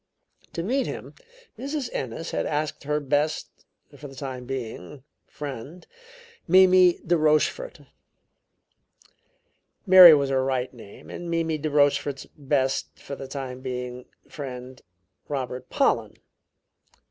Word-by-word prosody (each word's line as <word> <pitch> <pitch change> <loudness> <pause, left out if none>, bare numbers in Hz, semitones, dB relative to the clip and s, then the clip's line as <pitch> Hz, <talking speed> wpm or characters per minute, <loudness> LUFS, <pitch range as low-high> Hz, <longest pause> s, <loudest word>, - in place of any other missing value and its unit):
To 165 - -3
meet 260 +8 0
him, - - -7 0.5
Mrs. 280 0 -3
Ennis 130 +6 -4
had - - -1
asked 150 -1 -3
her 150 +1 0
best, 145 +2 -1 0.4
for 145 - -10
the 135 - -13
time 130 -2 -6
being, 130 0 -7 0.2
friend, 145 +4 -8 0.6
Mimi 185 0 +6
de 175 - +3
Rochefort 155 - +1 2.0
Mary 185 -4 +10
was 140 -2 0
her 130 -1 +2
right 130 -1 -1
name 110 -5 -13
and 175 - -7
Mimi 165 -2 -1
de 155 +1 -2
Rochefort's 145 -1 +1
best, 135 -2 -1
for 140 - -8
the 135 - -8
time 130 -2 -6
being, 125 -1 -5 0.2
friend, 130 -3 -8 0.5
Robert 130 -3 -4
Pollen. - - +1
145 Hz, 120 wpm, -25 LUFS, 130-165 Hz, 2.0 s, Mary